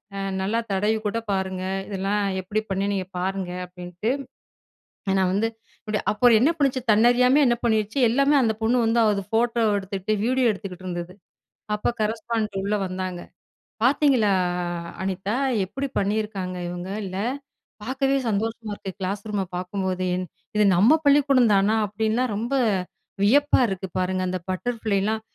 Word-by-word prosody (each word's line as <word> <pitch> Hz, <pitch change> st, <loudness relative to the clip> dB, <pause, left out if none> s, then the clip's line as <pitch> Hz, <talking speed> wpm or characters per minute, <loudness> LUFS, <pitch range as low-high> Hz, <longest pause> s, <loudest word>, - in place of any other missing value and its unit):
அ 195 Hz, -, -4 dB, 0.2 s
நல்லா 210 Hz, +5 st, 0 dB
தடவிக்கூட 215 Hz, +2 st, 0 dB
பாருங்க. 190 Hz, -1 st, -2 dB, 0.3 s
இதுலாம் 200 Hz, +1 st, -1 dB, 0.2 s
எப்பிடி 210 Hz, +4 st, -2 dB
பண்ணேன்? 195 Hz, +1 st, 0 dB
நீங்க 185 Hz, -2 st, -2 dB
பாருங்க." 190 Hz, -1 st, -2 dB
அப்பிடின்ட்டு, 180 Hz, +3 st, -5 dB, 1.0 s
ஏன்னா 190 Hz, -1 st, +3 dB
வந்து, 215 Hz, +3 st, +1 dB, 0.3 s
இப்புடி 215 Hz, -3 st, -2 dB
அப்புறம் 235 Hz, +1 st, +5 dB
என்ன 290 Hz, -, +5 dB
பண்ணுச்சு? 270 Hz, -2 st, +1 dB
தன்னறியாம 245 Hz, +6 st, +5 dB
என்ன 240 Hz, 0 st, +3 dB
பண்ணிடுச்சு? 220 Hz, +1 st, +1 dB
எல்லாமே 275 Hz, +4 st, +3 dB
அந்த 220 Hz, -2 st, +2 dB
பொண்ணு 230 Hz, +3 st, +2 dB
வந்து, 230 Hz, +1 st, +2 dB
அத 205 Hz, -3 st, +1 dB
ஃபோட்டோவ 230 Hz, -2 st, +2 dB
எடுத்துட்டு, 195 Hz, +1 st, -3 dB
வீடியோ 255 Hz, 0 st, +2 dB
எடுத்துக்கிட்டு 185 Hz, -2 st, -8 dB
இருந்தது. 175 Hz, 0 st, -5 dB, 0.6 s
அப்ப, 210 Hz, -, -1 dB
கரஸ்பாண்டன்ட் 220 Hz, -2 st, -1 dB
உள்ள 210 Hz, +1 st, +1 dB
வந்தாங்க. 185 Hz, -1 st, -4 dB, 0.6 s
"பார்த்தீங்களா! 260 Hz, -6 st, +4 dB, 0.7 s
அனிதா 195 Hz, +3 st, -2 dB, 0.3 s
எப்படி 270 Hz, +9 st, -4 dB
பண்ணியிருக்காங்க, 200 Hz, -2 st, -2 dB
இவுங்க? 175 Hz, +1 st, -6 dB, 0.2 s
இல்ல! 185 Hz, 0 st, -5 dB, 0.7 s
பார்க்கவே 270 Hz, +3 st, +1 dB
சந்தோஷமா 220 Hz, +1 st, -2 dB
இருக்கு. 195 Hz, -, -7 dB
கிளாஸ் 195 Hz, +2 st, -3 dB
ரூம 200 Hz, -2 st, -1 dB
பார்க்கும்போதே! 185 Hz, 0 st, -2 dB, 0.5 s
இது 210 Hz, -, +5 dB
நம்ம 235 Hz, -, +6 dB
பள்ளிக்கூடந்தானா! 250 Hz, -8 st, +4 dB
அப்பிடின்லாம் 220 Hz, +3 st, 0 dB
ரொம்ப 235 Hz, +6 st, -3 dB, 0.7 s
வியப்பா 285 Hz, +8 st, +4 dB
இருக்குது 190 Hz, -1 st, -5 dB
பாருங்க." 185 Hz, 0 st, 0 dB
அந்த 185 Hz, 0 st, -2 dB
பட்டர்ஃபிளைலாம் 220 Hz, 0 st, -1 dB
210 Hz, 130 wpm, -24 LUFS, 190-235 Hz, 1.0 s, நம்ம